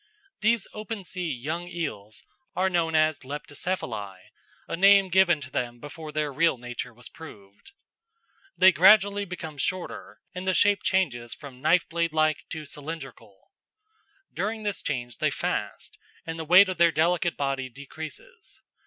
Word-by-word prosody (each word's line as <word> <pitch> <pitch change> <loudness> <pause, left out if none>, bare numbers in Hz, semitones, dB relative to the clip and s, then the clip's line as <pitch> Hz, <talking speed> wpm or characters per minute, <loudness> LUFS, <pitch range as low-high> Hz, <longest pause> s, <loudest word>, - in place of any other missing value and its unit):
These 225 0 +2
open 215 -1 -6
sea 180 -2 -4
young 155 +7 -4
eels 125 - -5 0.3
are 190 +1 +1
known 165 -2 +1
as 155 -1 +3
Leptocephali, 140 - -4 0.5
a - - -3
name 195 +1 +6
given 175 -3 +4
to 130 -1 -8
them 120 -1 -3
before 150 +2 -8
their 150 -1 -2
real 165 0 +2
nature 120 0 -6
was 120 +1 -12
proved. 105 - -14 0.8
They 190 +1 +8
gradually 200 +4 +5
become 160 -5 -7
shorter, 185 +5 -4
and 185 +1 -6
the 185 - +2
shape 205 0 +4
changes 125 - 0
from 130 -3 -12
knife 165 +4 +3
blade 170 -1 -1
like 155 -1 +2
to 155 -2 -6
cylindrical. 140 - -9 0.8
During 215 +4 -3
this 205 -1 -2
change 120 -3 -4
they - - +1
fast, - - -3 0.3
and 165 0 -5
the 160 - -4
weight 185 +5 +8
of 185 - -3
their 170 -1 +6
delicate 170 +2 +1
body 135 -2 -2
decreases. 160 - -10
160 Hz, 150 wpm, -26 LUFS, 135-185 Hz, 0.8 s, They